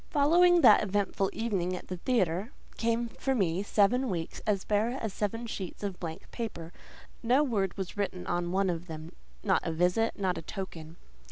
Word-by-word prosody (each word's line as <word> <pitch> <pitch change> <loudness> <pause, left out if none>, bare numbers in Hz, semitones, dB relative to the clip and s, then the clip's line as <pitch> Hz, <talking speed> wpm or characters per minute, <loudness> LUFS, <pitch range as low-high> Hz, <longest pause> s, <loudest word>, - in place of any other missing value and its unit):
Following 345 +4 +5
that 220 -7 +8
eventful 200 -1 0
evening 195 -5 -1
at - - -8
the 185 - -4
theatre, 195 0 0 0.2
came 230 +1 0
for 265 +3 -2
me 185 -5 +1
seven 225 +5 +2
weeks 165 -3 -4
as 200 -3 +1
bare 220 +5 +1
as 220 -4 -3
seven 225 +3 -2
sheets 195 -4 -6
of 195 -3 -3
blank 160 -2 -7
paper: 180 -8 -5 0.5
no 250 +5 +4
word 205 -9 -1
was 190 -2 -4
written 190 -3 -2
on 175 0 -1
one 190 0 +2
of 170 +1 -5
them; 160 0 -7 0.3
not 195 -3 +3
a 165 - -2
visit, 180 +7 +1
not 185 -2 0
a - - -7
token. 165 -3 -7
195 Hz, 180 wpm, -30 LUFS, 180-230 Hz, 0.5 s, that